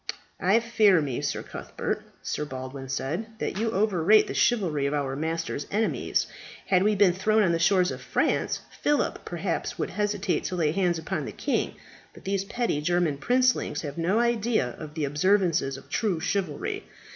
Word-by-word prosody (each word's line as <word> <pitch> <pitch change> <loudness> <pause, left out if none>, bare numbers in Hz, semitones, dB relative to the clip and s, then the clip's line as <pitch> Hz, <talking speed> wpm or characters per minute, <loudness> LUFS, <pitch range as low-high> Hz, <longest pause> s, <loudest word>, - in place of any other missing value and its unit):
"I 195 +5 +4
fear 220 -5 +4
me, 140 -5 -2
Sir - - -2
Cuthbert," - - -4 0.2
Sir - - -2
Baldwin 130 -1 -7
said, 175 +12 -3
"that 200 - -3
you 225 +1 +1
overrate 205 -1 +4
the - - -5
chivalry 170 - +2
of 145 - -1
our 135 -2 -1
master's 160 0 -3
enemies. 220 +2 0 0.4
Had 185 -2 +3
we 210 +2 +3
been 195 -3 +5
thrown 215 +4 +2
on 180 - +3
the 165 - +1
shores 180 +1 +3
of - - -6
France, - - 0 0.2
Philip 295 0 +1
perhaps - - -3
would - - -2
hesitate 205 -2 0
to 185 - -2
lay 160 -4 +2
hands 175 -1 +1
upon 160 - -3
the - - -5
king; - - -1 0.4
but - - -14
these 195 0 -1
petty 225 -8 -1
German 175 -2 +1
princelings 250 - +2
have 145 +1 -5
no 180 +6 +2
idea 235 - +1
of 155 -1 -8
the 155 -3 0
observances 165 -2 +2
of 135 - -14
true 200 -7 0
chivalry. 175 -4 -2
180 Hz, 175 wpm, -27 LUFS, 150-210 Hz, 0.4 s, been